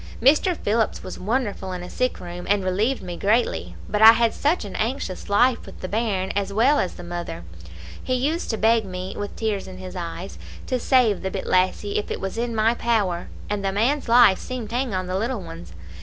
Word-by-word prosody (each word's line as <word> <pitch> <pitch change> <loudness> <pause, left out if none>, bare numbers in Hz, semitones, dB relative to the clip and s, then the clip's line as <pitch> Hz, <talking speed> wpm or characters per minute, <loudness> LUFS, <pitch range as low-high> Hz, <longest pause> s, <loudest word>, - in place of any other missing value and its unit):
Mr. 305 +8 +4
Phillips 220 +1 0
was 185 - -7
wonderful 205 -3 -2
in 180 -1 -5
a - - -7
sick 255 0 -1
room, 175 0 -7
and 205 -1 +2
relieved 210 +8 0
me 175 -1 -5
greatly; 215 +7 0
but 210 - -1
I 220 +1 +11
had 230 -1 +2
such 300 -2 0
an 200 - -8
anxious 220 -6 -3
life 240 +4 +3
with - - -11
the 185 - -4
bairn 205 -3 -1
as 200 0 -2
well 250 +8 +3
as 185 - -1
the - - -9
mother. 175 - -5 0.6
He 255 - 0
used 295 +7 -1
to 220 - -1
beg 225 +1 +3
me, 185 0 -6
with 205 0 -5
tears 215 -3 -2
in 185 -1 -9
his 185 0 -8
eyes, 175 +1 -6 0.3
to 255 - -1
save 240 -6 +3
the 190 - -2
bit 190 0 -5
lassie, 185 +3 +1
if 210 - -6
it - - -3
was 195 - -4
in 235 -1 -2
my 220 +1 +3
power, 210 -8 0 0.2
and 205 -1 -2
the 195 - 0
man's 240 +7 0
life 235 -5 +6
seemed 250 -4 -6
to - - -3
hang 255 -1 0
on 185 0 -1
the 185 +1 -2
little 235 +2 -1
one's. 85 - -10
210 Hz, 220 wpm, -23 LUFS, 185-235 Hz, 0.6 s, I